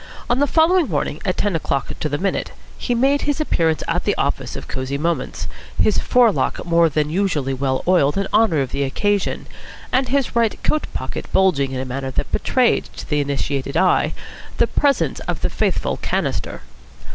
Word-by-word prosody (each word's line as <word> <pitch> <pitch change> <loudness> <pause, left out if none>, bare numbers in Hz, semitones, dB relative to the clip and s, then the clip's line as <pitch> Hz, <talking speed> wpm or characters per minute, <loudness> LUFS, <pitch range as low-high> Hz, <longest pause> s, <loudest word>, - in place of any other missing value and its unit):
On 245 - +2
the 285 - +3
following 330 - +3
morning, 150 -1 -2
at 185 - 0
ten 205 -4 0
o'clock 140 -4 -1
to 155 - -1
the 145 - -1
minute, 195 +5 -1 0.3
he 245 - -2
made 275 +4 +3
his 290 0 -1
appearance 165 - +1
at - - 0
the - - +1
office - - -2
of - - -7
Cosy 130 +1 -3
Moments, 160 -2 -2 0.3
his 210 - +3
fore 245 -3 +4
lock - - -2
more 170 -1 +4
than 150 0 0
usually 155 -7 0
well 130 0 -1
oiled 175 -4 +3
in 195 0 0
honour 190 -10 +4
of 130 - -3
the 140 - -2
occasion, 200 +9 0 0.5
and 255 -1 +1
his 275 -3 0
right 230 -2 +2
coat 305 - 0
pocket - - -5
bulging 150 -9 +2
in 130 - -3
a 130 - -3
manner 135 +1 -4
that 130 - -3
betrayed - - +2
to - - -7
the 150 - 0
initiated 140 -1 -2
eye 185 - +3 0.4
the - - +4
presence 285 -1 +1
of - - -2
the - - -1
faithful - - 0
"canister." - - -2
170 Hz, 190 wpm, -20 LUFS, 140-230 Hz, 0.5 s, fore